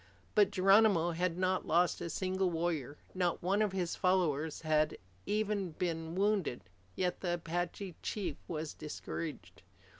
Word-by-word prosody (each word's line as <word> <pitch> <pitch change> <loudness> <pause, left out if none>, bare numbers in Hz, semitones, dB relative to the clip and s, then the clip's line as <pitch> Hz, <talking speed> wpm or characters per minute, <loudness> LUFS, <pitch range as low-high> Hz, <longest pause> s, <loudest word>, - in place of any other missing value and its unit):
But 205 -2 +5
Geronimo 195 -2 +5
had 175 +1 -1
not 185 0 0
lost 175 +1 +3
a 170 - -3
single 185 +1 0
warrior. 160 -5 -2 0.2
Not 180 -2 0
one 195 +4 +2
of 210 -2 +2
his 180 -3 -1
followers 160 -5 +1
had 155 -1 +2 0.3
even 205 -4 0
been 165 0 -3
wounded. 195 - +1 0.3
Yet 180 -1 -1
the 175 -2 0
Apache 175 +2 -3
chief 180 -9 -3
was 155 -2 -4
discouraged. 155 +1 -6
175 Hz, 140 wpm, -33 LUFS, 165-190 Hz, 0.3 s, But